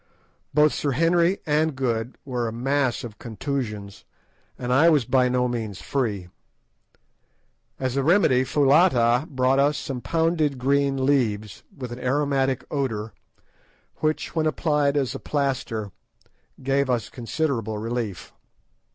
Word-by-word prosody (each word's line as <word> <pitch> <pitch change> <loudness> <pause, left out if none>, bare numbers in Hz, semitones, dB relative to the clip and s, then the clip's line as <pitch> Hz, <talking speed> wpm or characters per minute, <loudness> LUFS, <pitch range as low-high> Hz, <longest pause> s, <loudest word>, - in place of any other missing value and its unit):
Both 150 +1 +4
Sir 140 -2 -1
Henry 170 +5 +2
and 155 0 +1
Good 120 -2 -2
were 125 -3 -2
a - - -3
mass 130 +2 0
of 110 -4 -9
contusions, 110 -4 -5 0.5
and 125 0 -2
I 155 +6 +6
was 150 -7 +3
by 130 +1 +3
no 125 0 +1
means 110 -5 -4
free. 105 -10 -2 1.5
As 130 -1 -2
a 140 - +2
remedy 145 -5 +4
Foulata 135 -2 +3
brought 130 -1 +2
us 145 +1 +3
some 130 -3 -5
pounded 160 -3 +1
green 135 +1 +1
leaves, 110 -8 0 0.2
with 125 -3 -6
an 120 - -7
aromatic 135 0 0
odour, 115 -7 -2 0.8
which, 155 0 -1
when 160 -1 +2
applied 150 -1 +1
as 135 -3 0
a - - -6
plaster, 130 -7 -2 0.7
gave 135 0 +1
us 120 -4 0
considerable 120 -4 -2
relief. 115 -3 -4
130 Hz, 130 wpm, -24 LUFS, 120-145 Hz, 1.5 s, I